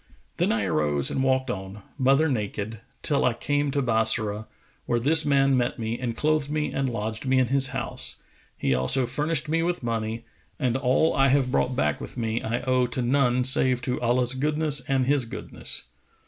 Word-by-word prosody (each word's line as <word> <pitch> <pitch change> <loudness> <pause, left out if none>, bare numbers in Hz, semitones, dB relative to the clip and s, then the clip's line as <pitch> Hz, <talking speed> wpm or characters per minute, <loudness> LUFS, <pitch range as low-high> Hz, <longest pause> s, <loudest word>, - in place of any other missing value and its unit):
Then - - +1
I 110 -2 0
arose 75 -5 0
and - - -1
walked 130 -1 +1
on, 95 -1 -7
mother 135 +3 +3
naked, 110 -3 -3 0.2
till 145 -3 +2
I 120 - +2
came 145 +2 -1
to 140 0 -1
Bassorah 110 -2 +1 0.4
where 120 -1 +1
this 150 +6 +4
man 135 -1 +3
met 120 -1 0
me 115 +1 -3
and 120 -3 -4
clothed 155 -2 0
me 150 0 -1
and 135 -1 -1
lodged 110 +1 -4
me 130 0 +3
in 130 -2 +2
his 135 0 +5
house, - - -4 0.4
he 65 - 0
also 65 - +2
furnished 155 +6 -1
me 165 +2 +1
with 175 -3 -2
money, 115 0 -3 0.3
and 125 -4 0
all 135 +4 +2
I 135 -1 +4
have 135 -1 +2
brought 125 0 0
back 75 -6 0
with - - -8
me 115 -1 -2
I 115 +2 -2
owe 130 -1 +1
to 125 +1 -2
none 125 -1 +2
save 130 -1 +4
to 125 -4 -2
Allah's 125 +1 +1
goodness 150 +1 +1
and 135 -2 +1
his 140 -1 +1
goodness. 115 - -6
125 Hz, 190 wpm, -25 LUFS, 115-140 Hz, 0.4 s, his